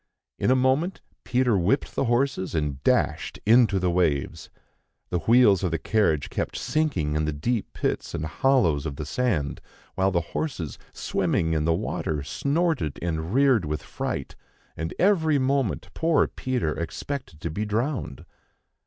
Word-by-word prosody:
In - - +1
a 130 - +5
moment, 130 +8 +1 0.2
Peter 125 -3 +2
whipped 115 +11 +1
the - - 0
horses, 120 -7 0
and 75 -3 -2
dashed - - +1
into 110 -2 +5
the 90 -1 +1
waves. 80 -6 0 0.6
The 90 - +1
wheels 110 -3 +5
of 90 - +1
the 80 - -1
carriage 80 -6 +1
kept - - -3
sinking 95 - 0
in 75 0 +1
the 75 - 0
deep 105 +10 -2
pits - - -2
and 75 - -3
hollows 85 - +2
in 70 - -5
the 75 - -5
sand, 80 - -1 0.3
while 95 0 +2
the 85 -2 +1
horses, 90 - -3
swimming 80 0 0
in 75 -1 0
the 80 0 +3
water, 75 -3 -2
snorted 140 - 0
and 80 0 -3
reared 130 -4 +4
with 75 0 -3
fright, - - -4 0.4
and 80 +1 -4
every 165 -6 +3
moment 135 -3 0
poor 165 -2 +3
Peter 125 - -2
expected 85 - -5
to 85 - -3
be 100 +7 -2
drowned. 110 - -2
100 Hz, 155 wpm, -25 LUFS, 80-130 Hz, 0.6 s, a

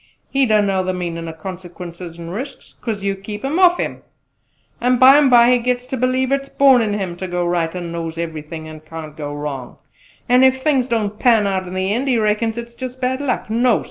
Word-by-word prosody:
He 270 -1 +2
don't 215 -2 +3
know 190 -1 +1
the 185 0 -2
meanin' 170 -2 -4
o' - - -7
consequences 175 0 -8
and 170 0 -7
risks, 260 +7 -7
'cause 215 -4 -4
you 200 0 0
kep' 205 +4 -7
'em 300 +6 0
off 355 -1 +6
him! - - -3 0.8
An' 250 +1 +3
bymbye 255 -2 +7
he 250 - +4
gets 245 +1 -1
ter 260 - -4
believe 255 +1 0
it's 275 0 -1
born 270 -3 +5
in 210 -2 0
him 190 -4 -3
ter 185 +1 -5
go 180 0 -1
right, 175 -1 -1
an' 175 -2 -5
knows 165 -1 -5
everything, 160 -1 -6
an' 155 0 -9
can't 155 -1 -9
go 145 -2 -5
wrong; 145 -4 -6 0.5
an' 250 +1 +5
ef 260 0 +3
things 270 -5 +2
don't 215 -4 -1
pan 230 -5 +4
out 190 -2 -1
in 180 - -7
the 190 +2 0
end 255 +5 -1
he 255 -3 +2
reckon 215 +1 +1
it's 235 0 -7
jus' 255 +1 -6
bad 260 +1 -2
luck! 280 -3 -2
No! 240 +1 +3
210 Hz, 220 wpm, -19 LUFS, 175-250 Hz, 0.8 s, bymbye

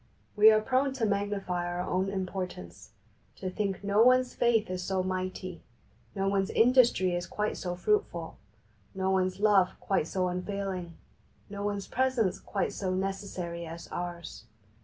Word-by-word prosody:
We 215 +1 +8
are 215 0 +5
prone 265 +4 +1
to 255 -4 -1
magnify 200 -3 -1
our 175 0 -2
own 185 +2 0
importance, 185 - -5 0.5
to 185 -1 -5
think 195 -1 -2
no 200 +2 +3
one's 255 +1 +5
faith 230 -2 +2
is 185 0 -3
so 185 0 -1
mighty, 185 -1 -4 0.5
no 195 0 0
one's 195 -1 +1
industry 235 -6 +4
is 175 0 -2
quite 210 0 -2
so 180 -1 -4
fruitful, 175 -3 -1 0.6
no 190 0 0
one's 185 0 +1
love 200 -3 +3
quite 190 -5 0
so 185 0 0
unfailing, 180 -1 -4 0.6
no 200 0 -5
one's 205 -1 -2
presence 255 -6 0
quite 200 - -2
so 190 -2 -2
necessary 185 -3 -4
as 165 +1 -8
ours. 175 -8 -6
195 Hz, 150 wpm, -29 LUFS, 180-210 Hz, 0.6 s, We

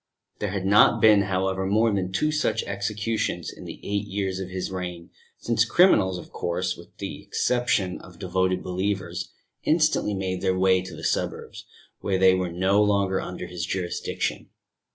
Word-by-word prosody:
There 105 - -1
had 95 -1 -3
not 100 +2 +5
been, 105 -2 +6
however, 95 0 -1
more 110 +2 +3
than 95 -2 -1
two 150 +10 +1
such 115 -8 0
executions 100 -3 -2
in - - -11
the - - -8
eight 100 0 -2
years 95 -2 -2
of 95 -1 -5
his 95 0 -4
reign, 90 -2 -6 0.3
since 115 -1 +1
criminals, 115 - +4
of - - -10
course, 90 +1 -2
with - - -16
the - - -6
exception 120 -7 0
of 90 - -14
devoted 95 -1 0
believers, 95 +2 -3 0.3
instantly 155 -9 +2
made 95 -1 -3
their 95 -1 +1
way 95 0 +4
to 95 - -9
the - - -10
suburbs, - - -3 0.3
where 95 -1 0
they 95 0 +6
were 95 -1 -1
no 95 +4 +2
longer 100 -2 +2
under 90 - -6
his 90 -1 -6
jurisdiction. 90 0 -3
95 Hz, 170 wpm, -25 LUFS, 95-105 Hz, 0.3 s, been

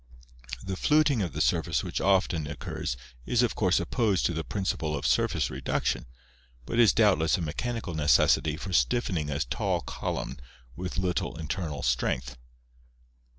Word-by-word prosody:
The 95 0 -3
fluting 150 0 +3
of 90 - -2
the - - -2
surface - - +1
which - - -3
often 95 -5 +2
occurs 65 -3 -4 0.3
is 125 0 +3
of 120 - +1
course 95 -3 +2
opposed 110 -7 +1
to 85 - +1
the 80 0 -2
principle 80 -6 -2
of - - -5
surface - - +1
reduction, 65 0 -1 0.6
but 115 - -2
is 115 -3 +7
doubtless 95 -8 +3
a - - -4
mechanical 110 +5 -3
necessity 75 0 +3
for 95 +2 -6
stiffening 80 - +1
a 70 0 -2
tall 65 - -1
column - - -4 0.4
with 90 +1 -5
little 90 -3 -1
internal 80 -3 -4
strength. 60 0 0
90 Hz, 150 wpm, -28 LUFS, 75-100 Hz, 0.6 s, is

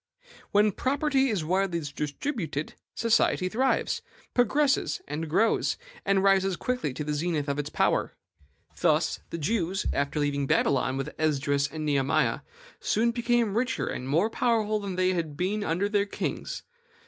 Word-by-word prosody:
When 210 +1 +4
property 270 +3 +1
is 195 -8 -1
widely 185 0 +1
distributed, 150 - -3 0.2
society 225 -5 +2
thrives, 260 +6 +1 0.3
progresses, 275 +4 +2 0.3
grows, 220 +9 +2 0.3
and 195 -1 +2
rises 195 -1 +3
quickly 250 - -2
to 150 - -3
the 150 0 -2
zenith 155 -1 -1
of 140 0 -1
its 145 0 -3
power. - - +1 0.6
Thus, - - +2
the - - -4
Jews, 185 +3 -1
after 140 +2 -1
leaving 140 -1 0
Babylon 135 -1 +2
with 135 - -4
Esdras 140 -2 +1
and 155 +1 -5
Nehemiah, 140 -2 +2 0.4
soon 235 +2 +1
became 235 -3 +1
richer 250 +3 0
and 125 - -4
more 170 +10 +2
powerful 220 -3 +1
than 200 -3 -4
they 185 0 +2
had 160 -5 -3
been 200 +4 -1
under 180 +3 0
their 205 -1 +1
kings. - - -4
185 Hz, 145 wpm, -27 LUFS, 150-225 Hz, 0.6 s, When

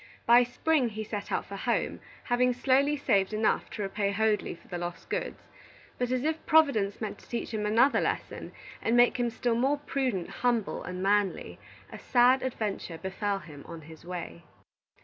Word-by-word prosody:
By 240 +1 +7
spring 255 +2 +1
he 215 0 -5
set 210 -1 -5
out - - -1
for 200 - -8
home, 235 +4 -1 0.2
having 250 +1 +2
slowly 275 +4 +2
saved 205 -7 +1
enough 215 +1 +1
to 210 - -5
repay 200 +1 -1
Hoadley 215 -1 0
for - - -21
the 175 - -5
lost 175 0 -6
goods. - - -3 0.6
But 245 -1 0
as 255 0 0
if 315 +1 -1
Providence 280 -11 +3
meant 215 -2 -5
to - - -19
teach 235 -1 -4
him 210 -1 -1
another 235 +6 +4
lesson, - - -3 0.3
and 230 +2 +2
make 245 +2 +5
him 240 -1 +1
still 235 +1 -1
more 265 +5 +2
prudent, 260 -10 -2
humble, 240 -4 -1
and 180 +1 -5
manly, 200 -1 0 0.3
a - - -8
sad 250 +1 +4
adventure 210 -9 -3
befell 195 +3 -2
him 155 -5 -11
on 165 -1 -8
his 160 +1 -13
way. 170 - -7
220 Hz, 180 wpm, -29 LUFS, 195-250 Hz, 0.6 s, By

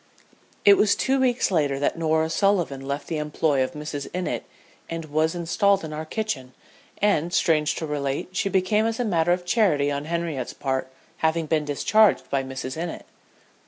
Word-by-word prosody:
It 200 -1 +8
was 210 -1 +4
two 270 0 +1
weeks 250 -4 +2
later 145 -6 +1
that 140 - 0
Norah 160 -1 +1
Sullivan 175 -7 +1
left 140 +1 -4
the 160 - -3
employ 150 -2 +1
of 130 - -4
Mrs. 150 -2 -5
Innitt 180 0 -2 0.4
and 165 -1 -4
was 155 +2 0
installed 195 +3 +2
in 155 - -7
our 155 +1 -5
kitchen; 155 - -4 0.5
and, 175 -5 +2
strange 155 -3 +2
to 160 - -3
relate, 145 0 -2
she 195 +2 -1
came 210 +4 +1
as 225 +1 -3
a 245 - 0
matter 175 -4 +2
of 175 0 0
charity 175 -9 +2
on 140 +1 -3
Henriette's 165 -6 -3
part 130 -1 -3 0.3
having 160 0 +1
been 155 -1 0
discharged 210 +9 +3
by 135 - +1
Mrs. 130 +3 -5
Innitt. 170 -1 -5
160 Hz, 175 wpm, -24 LUFS, 145-185 Hz, 0.5 s, It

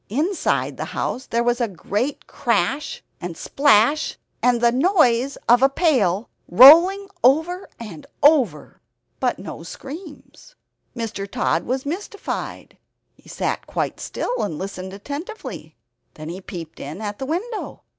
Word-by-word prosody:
Inside 310 - 0
the - - -3
house 260 - -2
there 235 +1 0
was 240 +1 +1
a 235 - +2
great 210 - -3
crash 290 +2 -1 0.2
and 170 -2 -6
splash, 285 +2 +3 0.2
and 245 -1 +3
the 235 0 +4
noise 270 - +2
of 240 +1 +6
a 270 - +6
pail 245 - +1 0.2
rolling 335 - +8 0.2
over 320 +8 +2
and 200 -10 -9 0.2
over. 260 - +3 0.4
But - - 0
no - - -8
screams. 325 - -11 0.4
Mr. 215 -4 -4
Tod - - 0
was 260 +3 -2
mystified; 390 +6 -5 0.4
he - - -20
sat - - -3
quite - - -3
still, - - -3
and 165 -7 -3
listened 190 0 -6
attentively. 285 - -7 0.4
Then 155 +1 -8
he 180 +3 -7
peeped 170 -4 -9
in 150 +6 -7
at 205 -1 -5
the 265 - -4
window. 410 - -4
255 Hz, 135 wpm, -22 LUFS, 205-315 Hz, 0.4 s, rolling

